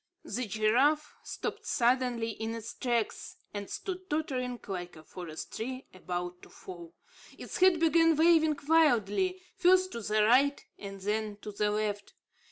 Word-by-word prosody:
The 240 +3 -3
giraffe 250 +9 +2
stopped - - -5
suddenly 240 -2 +1
in 220 +1 -4
its 230 0 -7
tracks, 235 -4 -2 0.2
and 205 -1 -5
stood 370 -1 -6
tottering 255 -5 -2
like 180 -3 -5
a 155 - -13
forest 165 -1 -8
tree 255 +3 -5
about 180 -1 -5
to - - -14
fall. 170 -2 -11 0.4
Its - - -6
head 370 -2 +5
began 330 0 +4
waving 315 -1 +4
wildly, 320 - +3 0.2
first 370 0 +4
to 235 - -5
the 215 0 +2
right 270 +6 +3
and 195 -1 -8
then 210 +1 -2
to 210 - -5
the 210 +1 0
left. 210 -1 -2
235 Hz, 150 wpm, -30 LUFS, 205-305 Hz, 0.4 s, head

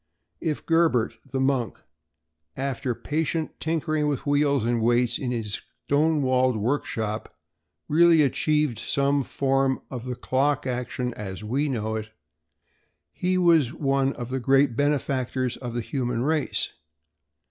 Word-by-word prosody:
If 155 -3 -3
Gerbert, 165 -9 +2
the 135 +1 -2
monk, 130 -3 0 0.8
after 130 -2 -2
patient 160 +3 -2
tinkering 155 -2 0
with 145 -3 -2
wheels 145 -3 +2
and 120 -1 +1
weights 120 +1 +2
in 130 - -2
his 115 -4 -3 0.2
stone 150 +1 +2
walled 130 -2 +2
workshop, 110 -2 -2 0.5
really 165 0 +5
achieved 150 -2 +1
some 140 0 +1
form 135 0 +1
of 125 -2 -6
the 125 -1 -3
clock 135 +3 0
action 125 -1 -2
as 100 -2 -6
we 135 +7 0
know 110 -4 -2
it, 110 0 -6 1.0
he 185 +1 0
was 165 -7 +4
one 135 -2 +1
of 120 -2 -6
the 130 +1 -2
great 135 0 +3
benefactors 130 -3 0
of 120 -2 -6
the 120 - 0
human 125 -2 -2
race. 155 +1 0
135 Hz, 135 wpm, -25 LUFS, 120-145 Hz, 1.0 s, really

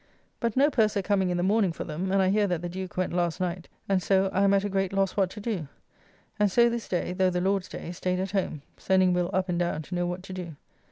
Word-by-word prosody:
But 235 -2 -1
no 285 +3 +5
purser 215 -5 +2
coming 190 -2 +1
in 175 - 0
the 175 - 0
morning 200 -1 +3
for - - -5
them, 175 +4 -3
and 195 0 +3
I 185 - +3
hear 205 +1 +2
that 175 -2 -2
the - - -2
Duke 185 +1 -6
went 185 -1 0
last 175 0 0
night, 180 -1 -3 0.2
and 195 -2 +2
so 190 +1 +2
I 195 - +2
am 200 - +4
at 195 - +2
a - - 0
great 195 -1 -1
loss 195 -1 +1
what 195 -3 +2
to 210 - -9
do; 200 -8 -3 0.7
and 205 -2 +3
so 235 +3 +5
this 235 -1 -4
day 180 0 -1
(though 185 0 +2
the 180 0 -1
Lord's 190 0 0
day) 170 - -6
staid 180 +1 -2
at 190 0 -2
home, 185 -7 -2
sending 185 -1 +3
Will 180 0 0
up 190 0 0
and 175 -1 -1
down 170 -3 -1
to 180 - -9
know 175 0 0
what 180 +1 -4
to 190 - -8
do. 175 -4 -6
185 Hz, 275 wpm, -27 LUFS, 180-195 Hz, 0.7 s, no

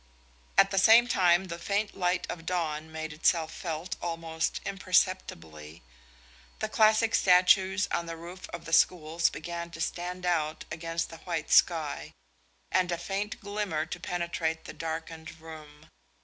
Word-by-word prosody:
At - - +6
the 195 - +2
same 225 +4 +7
time 180 -5 +3
the 170 -2 -6
faint 205 +4 -1
light 180 -1 0
of 165 - -6
dawn 160 -3 -2
made 160 -1 -5
itself 160 +1 +1
felt 165 0 -5
almost 165 -1 -2
imperceptibly; 85 - -1 0.7
the 215 - -2
classic 220 +1 +3
statues 190 +2 +4
on 170 - -1
the 165 0 -6
roof 175 +3 -10
of 170 -1 -8
the 165 - -6
schools 165 0 +3
began 170 +2 -6
to 165 -1 -11
stand 180 +2 -3
out 155 -3 -1
against 165 +1 -3
the 165 - -9
white 165 -2 -4
sky, 160 -4 +2 0.6
and 180 -1 +2
a 170 - 0
faint 195 +4 -4
glimmer 205 -6 -2
to 165 - -6
penetrate 170 -2 -2
the - - -8
darkened 160 0 -6
room. 155 -2 -12
170 Hz, 150 wpm, -29 LUFS, 160-185 Hz, 0.7 s, same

